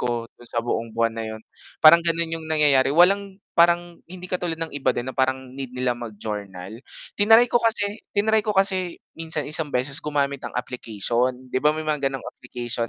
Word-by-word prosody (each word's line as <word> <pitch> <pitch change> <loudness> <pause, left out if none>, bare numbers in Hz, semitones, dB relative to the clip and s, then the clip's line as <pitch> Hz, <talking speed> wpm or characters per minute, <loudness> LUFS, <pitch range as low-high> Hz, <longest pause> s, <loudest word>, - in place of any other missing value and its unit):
ko 120 -1 -2
do'n 120 - -17
sa 115 0 -3
buong 115 -1 -2
buwan 115 0 +1
na 115 - -4
'yon. 110 0 -7 0.4
Parang 170 +2 +9
gano'n 165 -1 0
'yong 160 -1 -7
nangyayari. 145 -4 +4
Walang 195 +5 +3 0.2
parang 175 0 +2
hindi 180 0 -10
katulad 175 -3 -3
ng 165 -1 -4
iba 145 -1 0
din 130 +2 -3
na - - -23
parang 130 -1 -1
need 135 -2 -7
nila 125 -1 0
mag-journal. 105 -3 -7 0.3
Tinry 225 +4 +6
ko 240 0 +1
kasi 215 -1 0 0.2
tinaray 220 +2 +3
ko 215 - -2
kasi 190 -2 +2 0.2
minsan 160 -3 -2
isang 150 +1 +2
beses 135 +3 0
gumamit 140 -2 -1
ang - - -7
application. 125 +1 -2
'Di 130 - 0
ba 150 - +5
may 155 - -4
mga 150 -3 0
gano'ng 135 -1 -7
application 120 -1 -4
145 Hz, 190 wpm, -23 LUFS, 120-170 Hz, 0.4 s, Parang